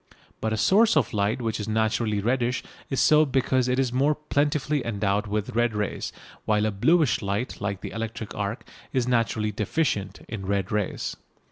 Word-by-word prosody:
But 110 Hz, -, -1 dB
a 110 Hz, -, 0 dB
source 205 Hz, -, +4 dB
of 130 Hz, -8 st, +1 dB
light 105 Hz, +4 st, 0 dB
which 115 Hz, -1 st, -1 dB
is 105 Hz, -, -4 dB
naturally 110 Hz, -1 st, +1 dB
reddish 120 Hz, +2 st, 0 dB, 0.3 s
is 135 Hz, -, -1 dB
so 155 Hz, 0 st, +6 dB
because 130 Hz, -2 st, +1 dB
it 125 Hz, 0 st, +1 dB
is 130 Hz, -2 st, +1 dB
more 140 Hz, +4 st, +3 dB
plentifully 150 Hz, -1 st, 0 dB
endowed 105 Hz, -1 st, 0 dB
with 105 Hz, 0 st, -2 dB
red 120 Hz, -1 st, +2 dB
rays, 105 Hz, -1 st, -2 dB, 0.3 s
while 105 Hz, 0 st, +2 dB
a 110 Hz, -, +1 dB
bluish 150 Hz, -, +3 dB
light 100 Hz, +4 st, -3 dB
like 100 Hz, -2 st, -2 dB
the -, -, -6 dB
electric 115 Hz, -1 st, -5 dB
arc 100 Hz, +4 st, -4 dB, 0.2 s
is 125 Hz, -2 st, 0 dB
naturally 115 Hz, -3 st, +1 dB
deficient 105 Hz, 0 st, -1 dB
in 100 Hz, -4 st, -6 dB
red 100 Hz, -1 st, -1 dB
rays. 105 Hz, -2 st, -2 dB
115 Hz, 175 wpm, -26 LUFS, 105-130 Hz, 0.3 s, so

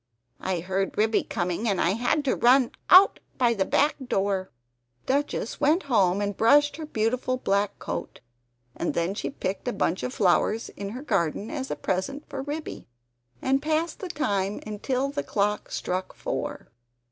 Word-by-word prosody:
I 185 Hz, -3 st, -2 dB
heard 190 Hz, +2 st, -2 dB
Ribby 220 Hz, +1 st, +3 dB
coming 180 Hz, +3 st, -2 dB
and 195 Hz, -, 0 dB
I 170 Hz, -, +3 dB
had 245 Hz, +8 st, 0 dB
to 265 Hz, -, +2 dB
run 250 Hz, 0 st, +4 dB, 0.2 s
out 375 Hz, +2 st, +8 dB, 0.2 s
by 240 Hz, -3 st, +3 dB
the 195 Hz, -4 st, 0 dB
back 290 Hz, +9 st, +2 dB
door!" 195 Hz, -3 st, 0 dB, 0.6 s
Duchess 275 Hz, -4 st, -1 dB
went 310 Hz, +5 st, +3 dB
home 200 Hz, -8 st, +2 dB
and 205 Hz, -1 st, -1 dB
brushed 290 Hz, +8 st, +4 dB
her 315 Hz, -2 st, -6 dB
beautiful 250 Hz, +1 st, 0 dB
black 200 Hz, -4 st, 0 dB
coat; -, -, -5 dB, 0.6 s
and 170 Hz, -, -2 dB
then 170 Hz, +3 st, 0 dB
she 205 Hz, -, -3 dB
picked 200 Hz, -5 st, -4 dB
a -, -, +1 dB
bunch 180 Hz, -, 0 dB
of -, -, -3 dB
flowers 215 Hz, +1 st, +2 dB
in 200 Hz, 0 st, -6 dB
her 265 Hz, -, -7 dB
garden 195 Hz, -, -1 dB
as 265 Hz, -3 st, -4 dB
a -, -, -2 dB
present 275 Hz, +11 st, -3 dB
for 270 Hz, -, -5 dB
Ribby; 295 Hz, +3 st, -6 dB, 0.6 s
and 270 Hz, +1 st, +2 dB
passed 315 Hz, +2 st, -1 dB
the 375 Hz, -, -5 dB
time 205 Hz, -, -1 dB
until 255 Hz, +6 st, -2 dB
the 285 Hz, 0 st, -2 dB
clock 210 Hz, -3 st, -1 dB
struck 185 Hz, +1 st, -3 dB
four. -, -, -4 dB
225 Hz, 170 wpm, -26 LUFS, 195-275 Hz, 0.6 s, out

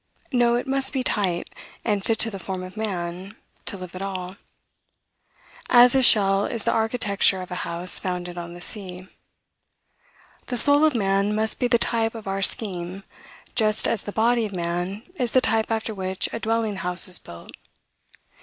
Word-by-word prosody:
No, 240 Hz, -1 st, +3 dB
it 245 Hz, -, -1 dB
must 270 Hz, +1 st, 0 dB
be 265 Hz, -2 st, 0 dB
tight, 185 Hz, -8 st, -1 dB, 0.3 s
and 205 Hz, -3 st, 0 dB
fit 225 Hz, +2 st, +1 dB
to 225 Hz, -, +2 dB
the 195 Hz, -, -6 dB
form 185 Hz, 0 st, -5 dB
of 185 Hz, +2 st, -9 dB
man, 190 Hz, -2 st, -4 dB, 0.3 s
to 200 Hz, -, -3 dB
live 185 Hz, -1 st, -9 dB
at 185 Hz, -, -6 dB
all; 185 Hz, -1 st, -5 dB, 1.3 s
as 245 Hz, 0 st, +7 dB
a 265 Hz, -, +4 dB
shell 200 Hz, -4 st, +5 dB
is 230 Hz, -3 st, -4 dB
the -, -, +1 dB
architecture 220 Hz, -4 st, +1 dB
of 180 Hz, -, -12 dB
a 180 Hz, -, -3 dB
house 175 Hz, +2 st, -3 dB
founded 180 Hz, -1 st, -4 dB
on 170 Hz, 0 st, -7 dB
the 175 Hz, -, -11 dB
sea. 185 Hz, -2 st, -3 dB, 1.4 s
The 250 Hz, -, -2 dB
soul 285 Hz, +5 st, +6 dB
of 305 Hz, -4 st, +2 dB
man 200 Hz, -1 st, +1 dB
must 220 Hz, 0 st, +1 dB
be 245 Hz, -, +2 dB
the 240 Hz, 0 st, +4 dB
type 225 Hz, -1 st, 0 dB
of 220 Hz, -3 st, -8 dB
our 195 Hz, 0 st, -2 dB
scheme, 190 Hz, -2 st, -1 dB, 0.5 s
just 215 Hz, -2 st, +2 dB
as 225 Hz, -, 0 dB
the 205 Hz, -, -6 dB
body 230 Hz, +2 st, +2 dB
of 200 Hz, -, -8 dB
man 175 Hz, +4 st, -3 dB
is 245 Hz, -3 st, -1 dB
the 255 Hz, -, +6 dB
type 225 Hz, -3 st, +1 dB
after 220 Hz, 0 st, -2 dB
which 190 Hz, -1 st, -2 dB
a -, -, -3 dB
dwelling 225 Hz, -2 st, -1 dB
house 180 Hz, 0 st, 0 dB
is 180 Hz, -, -2 dB
built. 85 Hz, -, -12 dB
200 Hz, 180 wpm, -24 LUFS, 185-230 Hz, 1.4 s, as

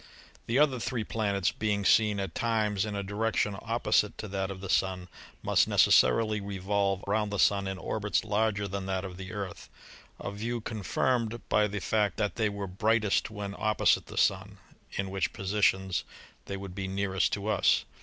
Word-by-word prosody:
The 115 Hz, -, +1 dB
other 140 Hz, -4 st, +3 dB
three 120 Hz, -1 st, -2 dB
planets, 100 Hz, -4 st, 0 dB
being 105 Hz, -1 st, -1 dB
seen 105 Hz, -1 st, +4 dB
at 95 Hz, -4 st, -4 dB
times 110 Hz, -4 st, 0 dB
in 105 Hz, -, -4 dB
a 100 Hz, -, -2 dB
direction 105 Hz, 0 st, 0 dB
opposite -, -, +1 dB
to 110 Hz, -, -6 dB
that 95 Hz, 0 st, -2 dB
of 95 Hz, -1 st, -6 dB
the 95 Hz, -, -7 dB
Sun, 90 Hz, -1 st, 0 dB, 0.3 s
must -, -, +3 dB
necessarily 105 Hz, -, +4 dB
revolve 100 Hz, 0 st, -1 dB
round 105 Hz, +1 st, 0 dB
the 100 Hz, -, -3 dB
Sun 100 Hz, 0 st, +3 dB
in 95 Hz, 0 st, -3 dB
orbits 105 Hz, +1 st, -1 dB
larger 105 Hz, -1 st, 0 dB
than 100 Hz, 0 st, -4 dB
that 95 Hz, 0 st, -2 dB
of 90 Hz, -1 st, -8 dB
the 95 Hz, +1 st, -7 dB
Earth, 100 Hz, -3 st, -6 dB, 0.5 s
a -, -, -5 dB
view 115 Hz, +4 st, -3 dB
confirmed 115 Hz, +2 st, -1 dB
by 105 Hz, 0 st, +3 dB
the 105 Hz, 0 st, -4 dB
fact 105 Hz, -2 st, 0 dB
that 105 Hz, -1 st, -1 dB
they 110 Hz, -2 st, +1 dB
were 100 Hz, -1 st, -4 dB
brightest 105 Hz, +3 st, +1 dB
when 105 Hz, -2 st, -5 dB
opposite 110 Hz, 0 st, +2 dB
the -, -, -10 dB
Sun -, -, +1 dB, 0.4 s
(in 95 Hz, -1 st, -3 dB
which 95 Hz, 0 st, -1 dB
positions 95 Hz, -2 st, +1 dB, 0.4 s
they 100 Hz, -, -4 dB
would 95 Hz, -2 st, -8 dB
be 95 Hz, 0 st, -4 dB
nearest 95 Hz, -1 st, 0 dB
to 100 Hz, 0 st, -2 dB
us). 110 Hz, -, +3 dB
100 Hz, 180 wpm, -29 LUFS, 95-110 Hz, 0.5 s, seen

